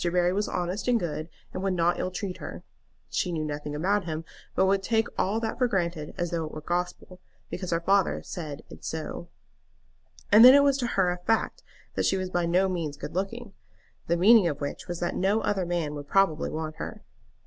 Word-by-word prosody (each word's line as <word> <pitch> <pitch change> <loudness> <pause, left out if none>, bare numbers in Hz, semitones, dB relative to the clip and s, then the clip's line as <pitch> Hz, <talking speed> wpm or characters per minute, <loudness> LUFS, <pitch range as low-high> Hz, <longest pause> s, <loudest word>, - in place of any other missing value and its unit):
Barry 175 +1 +2
was 205 +2 0
honest 180 +5 -2
and 245 -2 +4
good, 160 -2 -4 0.2
and - - -4
would 190 -1 0
not 175 0 +2
ill - - -1
treat 185 0 -4
her. - - -8 0.5
She 180 - 0
knew 155 -2 -2
nothing 150 0 -4
about 190 +5 +1
him, 160 -1 -4 0.3
but - - +4
would 195 +1 +2
take 225 +2 +1
all 205 +4 +1
that 225 +1 -3
for 250 - +4
granted 170 -7 -2
as 175 -1 -2
though 170 -1 -1
it 155 - -7
were 155 - -7
gospel, 180 +2 -3 0.3
because 185 - -4
her 165 - +1
father 195 +2 +3
had - - -8
said 155 -5 -6 0.2
so. 160 +2 -5 1.0
And 215 +2 +9
then 255 +2 +11
it 285 - +7
was 280 -1 +3
to 245 - 0
her 185 -2 +4
a 175 - -3
fact 225 +5 0 0.3
that - - +1
she 190 - +2
was 185 -1 -3
by 175 -1 +1
no 180 +3 +3
means 165 -6 -3
good - - -7
looking, 200 +4 -4 0.5
the 170 - +2
meaning 205 +1 +7
of 145 -3 -2
which 145 -1 -5
was 175 -1 -4
that 175 - -1
no 200 +4 +2
other 190 -3 0
man 170 -4 -1
would 145 -1 -7
probably 190 -3 +2
want 155 0 -4
her. - - -7
180 Hz, 215 wpm, -27 LUFS, 165-195 Hz, 1.0 s, then